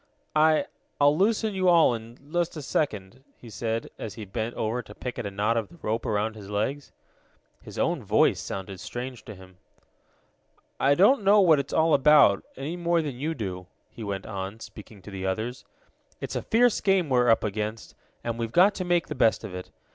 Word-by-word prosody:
"I 155 0 +4 0.3
I'll 145 +1 +5
loosen 215 +4 +1
you 185 -1 +2
all 170 -7 +5
in 115 +1 -8 0.2
just 175 -1 0
a 150 - -6
second," 120 -4 -2
he 115 - -13
said, 115 +2 -3
as 110 - -6
he 110 - -7
bent 110 +4 -4
over 115 +3 -2
to 105 -2 -14
pick 125 -1 -6
at 120 - -4
the - - -2
knot 105 +4 0
of 110 -3 -2
the 170 - -16
rope 110 +2 -2
around 110 +1 0
his 100 -2 -10
legs. 120 +8 -2 0.7
His - - -11
own - - 0
voice - - +3
sounded 95 -1 -6
strange 125 -2 -6
to 110 - -9
him. 95 -1 -16 1.2
"I 140 +1 +4
don't 205 - +4
know 205 +2 +6
what 165 -7 +5
it's 140 - -4
all 160 0 +3
about, 145 -7 +5
any 145 +6 -4
more 170 -1 +1
than 135 -5 -5
you 160 +3 -2
do," 90 -6 -5 0.2
he 115 - -9
went 100 -2 -4
on, 100 +1 -6
speaking 105 -3 -12
to 105 - -10
the 95 -1 -4
others. 110 +6 -3 0.5
"It's - - -5
a - - -1
fierce 240 0 +2
game 195 -4 +2
we're 125 -3 +3
up 115 - +4
against, 105 +1 -4 0.3
and 115 0 -3
we've 115 -1 -3
got 185 - +5
to 185 - -4
make 175 -1 +1
the - - -5
best 115 -4 +2
of 105 -4 -7
it. 90 0 -7
120 Hz, 205 wpm, -26 LUFS, 105-160 Hz, 1.2 s, know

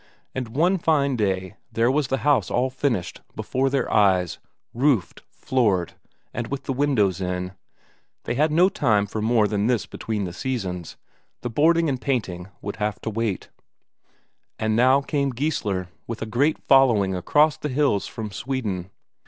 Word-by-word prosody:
And 130 -2 -3
one 180 +5 +3
fine 140 -5 +2
day 95 -2 -1
there 115 +2 +2
was 145 -1 +1
the 135 +1 -2
house 135 -10 +3
all 130 +2 +1
finished, 125 -8 -2
before 135 +1 0
their 135 -2 0
eyes, 95 -5 +3 0.3
roofed, 125 - +1
floored, 105 -9 0 0.4
and 120 -1 -3
with 140 -1 -4
the 135 - -2
windows 115 -10 +1
in. 90 0 -2 0.7
They - - -2
had 150 +5 +2
no 175 +4 +5
time 105 - +2
for 105 +2 -4
more 110 -1 +3
than 105 0 0
this 120 -3 +1
between 110 -2 -4
the 90 -2 -4
seasons; 95 -8 -4 0.4
the 120 - -4
boarding 165 +6 +3
and 130 -3 -2
painting 95 -10 -2 0.2
would 100 - -5
have 105 -1 -2
to 110 - -3
wait. 110 -3 -2 1.1
And 110 0 0
now 130 +4 +5
came 140 -1 -1
Geissler 115 - -2 0.2
with 115 -1 -4
a - - -3
great 135 +8 +1
following 120 -8 +4
across 150 - +3
the 150 - -4
hills 135 -7 +1
from 110 -2 -6
Sweden. 105 -6 -3
120 Hz, 160 wpm, -24 LUFS, 100-140 Hz, 1.1 s, no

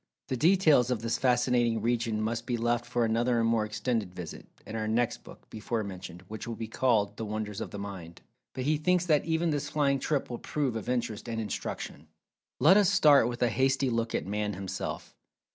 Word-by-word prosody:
The 130 - 0
details 155 -4 +4
of 120 -3 -1
this 115 - -1
fascinating 120 -2 +2
region 115 -1 0
must 115 +2 -2
be 120 - 0
left 120 +1 0
for 120 -1 +1
another 115 +2 +1
and 115 - +2
more 115 -2 +2
extended 105 -3 -2
visit, 85 -3 -8 0.2
in 110 - -7
our 110 -1 -2
next 115 +2 0
book - - -14
(before 110 +1 -3
mentioned) 90 -2 -8
which 110 +3 -7
will 115 - -4
be 115 0 -5
called 110 -3 +1
"The 110 - -4
Wonders 105 -1 -4
of - - -4
The - - -7
Mind." 95 -4 -8 0.3
But 130 - -4
he 150 +3 +2
thinks 180 +3 +2
that 155 -4 +2
even 165 0 +1
this 145 0 -2
flying 140 -2 +1
trip 145 0 -1
will 120 - -4
prove 140 -6 -2
of 110 - -4
interest 120 -2 -2
and 115 -1 -2
instruction. 95 -7 -5 0.5
Let 165 +9 +7
us 205 -3 +5
start 150 - +6
with 120 0 -2
a 120 - +3
hasty 135 +2 +1
look 115 0 -1
at - - -1
Man 105 +1 -2
himself. 95 0 -5
120 Hz, 210 wpm, -29 LUFS, 110-130 Hz, 0.5 s, Let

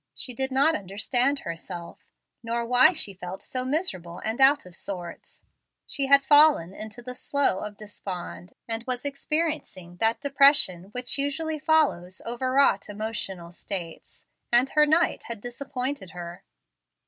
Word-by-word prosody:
She 250 - -1
did 265 +2 -2
not 275 +5 +4
understand 245 - 0
herself; 170 +1 -7 0.4
nor 235 0 -2
why 250 +5 +6
she 225 - -1
felt 180 0 -8
so 255 -1 -3
miserable 255 - -2
and 225 +4 -2
out 275 -1 +5
of 180 -1 -10
sorts. 175 -3 -7 0.4
She 275 -2 -2
had 275 0 +5
fallen 290 - +6
into 220 +4 -9
the 250 +1 -6
"Slough 275 -5 0
of 210 -1 -7
Despond," 190 -3 -8
and 225 0 -3
was 250 +1 -3
experiencing 285 - -3
that 225 +3 +1
depression 275 - +4
which 250 +6 -2
usually 310 +3 -2
follows 285 - +1
overwrought 250 -3 +1
emotional 205 -5 -5
states, 175 -2 -7 0.3
and 245 +3 +4
her 300 0 +4
knight 320 +3 +2
had 235 -2 -5
disappointed 250 -1 -5
her. 175 0 -9
240 Hz, 140 wpm, -26 LUFS, 190-280 Hz, 0.4 s, why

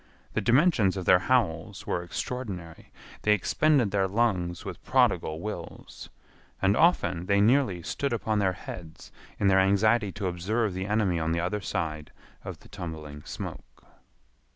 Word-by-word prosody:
The - - 0
dimensions 120 - +3
of 95 - -4
their 90 - +6
howls 95 -4 0
were 85 - -1
extraordinary. 90 -3 -6 0.3
They 105 - +4
expended 125 - +2
their 95 -1 +1
lungs 95 -5 0
with - - -7
prodigal 80 0 +2
wills. 105 +4 -8 0.5
And 100 +1 +3
often 95 - +2
they 100 0 +3
nearly 105 -5 +3
stood 140 - -2
upon 110 -2 0
their 95 -2 +2
heads 85 -3 -10 0.3
in - - 0
their 95 0 +5
anxiety 100 +2 +3
to 100 +3 -5
observe 95 +4 -1
the 95 +1 -4
enemy 105 -5 +1
on 80 +1 0
the 85 - 0
other 95 +4 -2
side 80 -5 -3 0.3
of - - -8
the - - -16
tumbling 80 -6 -7
smoke. - - -8
95 Hz, 155 wpm, -27 LUFS, 85-110 Hz, 0.5 s, their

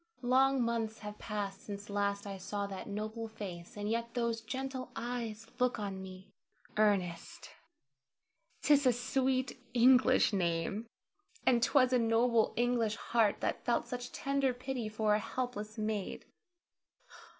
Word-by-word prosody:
Long 260 +1 +4
months 225 -2 -1
have 210 0 -7
passed 200 -2 -4
since 200 0 -7
last 200 0 -1
I 200 -1 -5
saw 200 +2 -3
that 195 -1 -6
noble 215 +2 -4
face, 185 -5 -8
and 205 0 -3
yet 230 +2 -2
those 235 -2 0
gentle 260 +2 -4
eyes 230 -2 -4
look 250 0 +2
on 195 -3 -4
me! 190 +1 -10 0.4
Ernest! 195 -5 0 1.1
'tis 285 -2 +5
a 250 - +5
sweet 260 +2 0 0.2
English 255 -1 +6
name, 175 +4 0 0.6
and 240 -2 +4
'twas 255 +1 +4
a 250 - +5
noble 230 0 +3
English 235 -3 +1
heart 225 -3 +1
that - - -1
felt 240 - +1
such 245 0 -5
tender 275 -2 0
pity 250 -3 -3
for 215 0 +1
a 210 - +3
helpless 215 -2 -4
maid. 215 -2 -3
225 Hz, 140 wpm, -33 LUFS, 205-250 Hz, 1.1 s, English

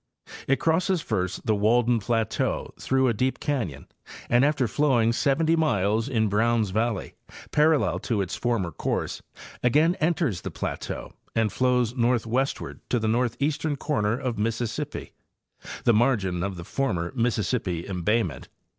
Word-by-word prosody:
It 135 - +2
crosses 170 +1 +1
first 95 -4 -2
the 110 - +3
Walden 115 +3 +3
plateau 110 +1 -1
through 130 0 +2
a 120 - +2
deep 130 +5 -1
canyon, 120 - -2 0.5
and 120 +2 +5
after 145 -4 +2
flowing 120 -3 +2
seventy 160 +6 +2
miles 110 - +1
in 110 -4 +1
Browns 110 0 +1
valley, 110 0 -1 0.4
parallel 150 0 +3
to 115 -5 -1
its 95 -3 -2
former 115 -8 -1
course, - - -3 0.4
again 150 +8 +4
enters 155 - 0
the - - -4
plateau - - -5 0.2
and 110 -2 +2
flows 125 -2 +1
northwestward 120 +2 0
to 125 - +2
the 110 -1 -1
nee: 120 +3 +2 0.4
n 145 - 0
corner 120 -7 0
of 125 -5 -3
Mississippi, 115 +1 -3 0.7
the 120 - +4
margin 105 -7 +2
of 95 +1 -2
the 85 - -7
former 90 -9 -1
Mississippi 110 -6 0
embayment. 100 +5 -1
115 Hz, 140 wpm, -26 LUFS, 105-135 Hz, 0.7 s, and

